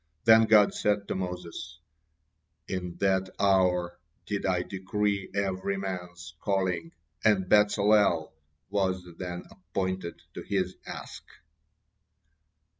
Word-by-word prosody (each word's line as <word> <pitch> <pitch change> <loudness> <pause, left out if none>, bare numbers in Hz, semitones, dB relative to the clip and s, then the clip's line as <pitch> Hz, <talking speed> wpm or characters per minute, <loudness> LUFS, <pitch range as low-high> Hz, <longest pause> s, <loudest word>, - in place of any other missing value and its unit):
Then 110 0 +7
God 105 -2 +6
said 105 -1 0
to - - 0
Moses: 90 -4 -5 0.9
"In 90 -2 -4
that 95 -1 +2
hour 90 -3 +2 0.3
did 100 -1 -2
I 90 -1 +1
decree 100 +1 -2
every 95 0 -1
man's 90 -3 -6
calling, 90 -4 -1 0.3
and 100 -4 +3
Bezalel 105 -5 +4 0.4
was 95 -3 0
then 90 -1 -5
appointed 95 -2 -4
to - - -6
his 95 -2 -1
task." - - -8
95 Hz, 105 wpm, -28 LUFS, 90-100 Hz, 0.9 s, Then